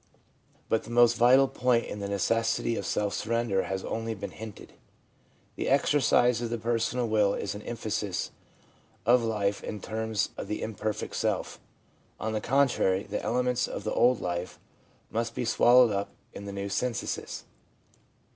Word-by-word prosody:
But 110 - +1
the - - -11
most 120 0 +5
vital 130 +3 +6
point 125 -2 +1
in 105 - -6
the 100 - -3
necessity 115 +4 +1
of - - -4
self 105 -1 0
sur 110 - -4
render 115 -5 +1
has 95 0 -3
only 115 0 -3
been 100 - -6
hinted. 110 -2 -10 0.8
The - - -2
exercise 130 -3 +3
of 120 - -2
the 120 - -2
per 115 +1 0
sonal 120 +2 -1
will 105 -2 +2
is 100 - -3
an 105 - -7
emphasis 105 -4 -3 0.7
of 125 +1 +5
life 105 -3 -1
in 105 - -5
terms 110 0 -2
of - - -5
the 105 - -3
imperfect 110 -1 -3
self. - - -1 0.6
Oathe 110 -1 -2
contrary, 120 -8 +2
the 105 - -4
elements 125 +2 0
of - - -6
the - - -2
old 125 -1 +3
life 90 0 -3 0.5
must 115 +1 -2
be 120 - -2
swallowed 120 +1 +5
up 100 0 -2 0.2
in 100 - -8
the 100 - -5
new 100 0 -4
synthesis. 120 +4 -3
110 Hz, 165 wpm, -28 LUFS, 105-120 Hz, 0.8 s, vital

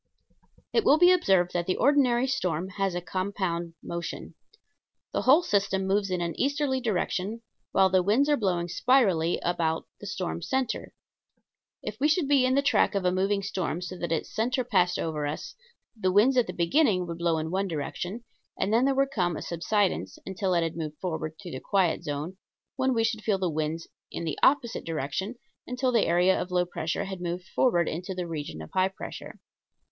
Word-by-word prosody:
It 455 - +3
will 290 - +6
be 355 +2 +7
observed 190 - +3
that 175 -1 -1
the 185 - +1
ordinary 255 -3 +3
storm 185 -10 -1
has 195 -2 -1
a 175 - -2
compound 185 -3 -3
motion. 170 0 -5 0.8
The - - 0
whole 295 +7 +5
system 195 - +1
moves 195 +1 +1
in 180 -1 -1
an 170 -1 -2
easterly 280 -1 0
direction, 215 0 -2 0.3
while 190 0 +5
the 185 -1 +4
winds 220 +10 +3
are 295 - +4
blowing 180 -8 0
spirally 180 -5 +2
about 165 -2 0
the 205 - -8
storm 180 -3 -3
center. 265 +4 -2 0.9
If - - -6
we 290 - +3
should 315 -1 +2
be 275 -3 +4
in 260 - +2
the 280 - +3
track 275 - +3
of 195 -2 0
a 180 - +4
moving 195 +2 0
storm 185 -4 -2
so 180 +1 -6
that 170 - -3
its 165 - -2
center 250 +3 0
passed 185 -7 +2
over 150 -3 -2
us 150 - -5 0.4
the 185 -4 0
winds 220 +8 +4
at 250 -2 +3
the 180 - -5
beginning 180 - +2
would 170 -1 -6
blow 170 -1 +1
in 160 +1 -3
one 195 +2 0
direction 180 +7 -4 0.3
and 205 - 0
then 235 +3 +4
there 275 0 +2
would 275 0 +2
come 175 - 0
a - - -6
subsidence 170 - -1
until 190 -1 -1
it 170 - +2
had 165 -1 -3
moved 155 -2 -5
forward 160 -3 -4
through 180 -4 -8
the 130 - -5
quiet 185 -1 +1
zone, 150 +5 -4 0.4
when 260 -1 +1
we 225 - +2
should 225 -1 -1
feel 210 -3 +1
the 185 -3 -1
wind 155 +1 -2 0.3
in - - -5
the 160 -3 -3
opposite 265 -4 +3
direction 165 - -3 0.3
until 250 +1 0
the 230 -3 +3
area 180 +2 +3
of 180 - -5
low 180 0 +1
pressure 175 +2 -3
had 190 -2 -6
moved 175 +1 -3
forward 175 -10 +2
into 180 +4 -4
the 180 -1 -3
region 150 - -5
of 80 - -12
high 185 0 +3
pressure. 195 - -9
190 Hz, 200 wpm, -27 LUFS, 170-235 Hz, 0.9 s, be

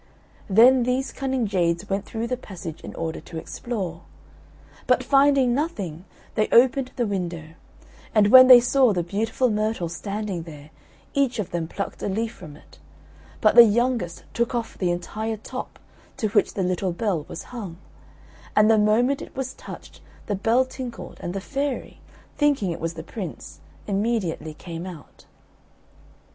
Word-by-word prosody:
Then 245 +6 +6
these 250 +2 0
cunning 265 -3 -1
jades 180 -1 0
went 195 +1 -2
through 225 0 -4
the 250 +2 -1
passage 185 -9 -9
in - - -9
order 160 -1 -4
to 160 - -9
explore. 180 -1 -5 0.9
But - - +3
finding 275 -3 +4
nothing, 195 - -3 0.3
they 215 -1 +1
opened 255 +2 +4
the 240 - 0
window; 175 -6 -4 0.7
and 210 -1 +5
when 255 +2 +10
they 250 -1 +11
saw 250 -1 +3
the 175 -2 0
beautiful 220 +7 0
myrtle 215 -4 -1
standing 200 +1 -4
there, 150 -2 -11 0.4
each 275 -3 +1
of 195 -4 -3
them 170 -2 -2
plucked 200 +4 -5
a - - -2
leaf 220 +3 -2
from 155 -5 -11
it; - - -20 0.6
but 215 - +5
the 235 - +11
youngest 230 -5 0
took 235 +1 0
off 230 -2 -3
the 180 - -1
entire 215 +6 -3
top, 210 - -7 0.4
to 215 - -1
which 205 -1 +1
the 195 - 0
little 185 0 -1
bell 180 -5 -1
was - - -7
hung; 200 -9 -6 0.8
and 215 +1 +6
the 220 - +5
moment 235 +6 +2
it - - -10
was 265 -1 -3
touched - - -11 0.2
the 210 - -2
bell 225 +6 +2
tinkled 255 -3 -8
and 175 - -5
the - - -1
fairy, 275 +4 -4 0.3
thinking 285 - +2
it 165 - -6
was 165 0 -3
the 160 - -7
Prince, 185 -2 -8 0.3
immediately 195 -7 -1
came 170 +2 -7
out. 165 -6 -12
210 Hz, 160 wpm, -24 LUFS, 175-245 Hz, 0.9 s, they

